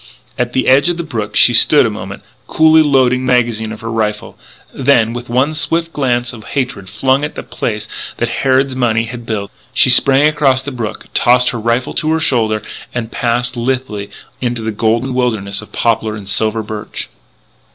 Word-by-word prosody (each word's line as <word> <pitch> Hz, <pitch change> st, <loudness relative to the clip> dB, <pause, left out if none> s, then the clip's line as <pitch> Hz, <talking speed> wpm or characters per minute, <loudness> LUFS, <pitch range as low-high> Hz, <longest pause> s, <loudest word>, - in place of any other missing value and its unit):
At 125 Hz, 0 st, -2 dB
the 130 Hz, -, 0 dB
edge 140 Hz, +6 st, +4 dB
of 175 Hz, -, -2 dB
the 170 Hz, -, -3 dB
brook 110 Hz, -9 st, -5 dB
she 120 Hz, -, +6 dB
stood 135 Hz, +4 st, +6 dB
a -, -, +1 dB
moment, 100 Hz, -1 st, -8 dB, 0.2 s
coolly 160 Hz, 0 st, +5 dB
loading 130 Hz, -4 st, +2 dB
the 130 Hz, 0 st, +1 dB
magazine 115 Hz, -3 st, 0 dB
of 110 Hz, -, -9 dB
her 115 Hz, 0 st, -5 dB
rifle. 105 Hz, -2 st, -3 dB, 0.4 s
Then, 120 Hz, -4 st, +2 dB
with 120 Hz, 0 st, -7 dB
one 130 Hz, +6 st, +1 dB
swift 165 Hz, +2 st, 0 dB
glance 120 Hz, -4 st, -1 dB
of 110 Hz, -2 st, -11 dB
hatred, 125 Hz, -9 st, -4 dB
flung 130 Hz, +7 st, +1 dB
at 150 Hz, -, -4 dB
the -, -, -6 dB
place 105 Hz, -1 st, -4 dB, 0.3 s
that 120 Hz, -, -1 dB
Harrod's 135 Hz, 0 st, +1 dB
money 115 Hz, -3 st, +1 dB
had 120 Hz, 0 st, -8 dB
built, 100 Hz, -3 st, -3 dB, 0.2 s
she 130 Hz, -, +6 dB
sprang 135 Hz, +3 st, +6 dB
across 135 Hz, -4 st, +2 dB
the 140 Hz, -, -5 dB
brook, 115 Hz, -4 st, -5 dB
tossed 125 Hz, +1 st, +3 dB
her 120 Hz, -, -5 dB
rifle 115 Hz, +3 st, -1 dB
to 155 Hz, -, -1 dB
her 160 Hz, -, +1 dB
shoulder, 110 Hz, -8 st, +1 dB, 0.3 s
and 120 Hz, -2 st, -4 dB
passed 120 Hz, +1 st, -1 dB
lithely 120 Hz, -4 st, -3 dB, 0.3 s
into 120 Hz, -2 st, -2 dB
the 110 Hz, -, -2 dB
golden 115 Hz, +4 st, 0 dB
wilderness 110 Hz, -6 st, -1 dB
of 105 Hz, -, -14 dB
poplar 110 Hz, -2 st, 0 dB
and 100 Hz, -2 st, -9 dB
silver 110 Hz, +2 st, 0 dB
birch. 105 Hz, 0 st, -6 dB
120 Hz, 190 wpm, -15 LUFS, 110-130 Hz, 0.4 s, she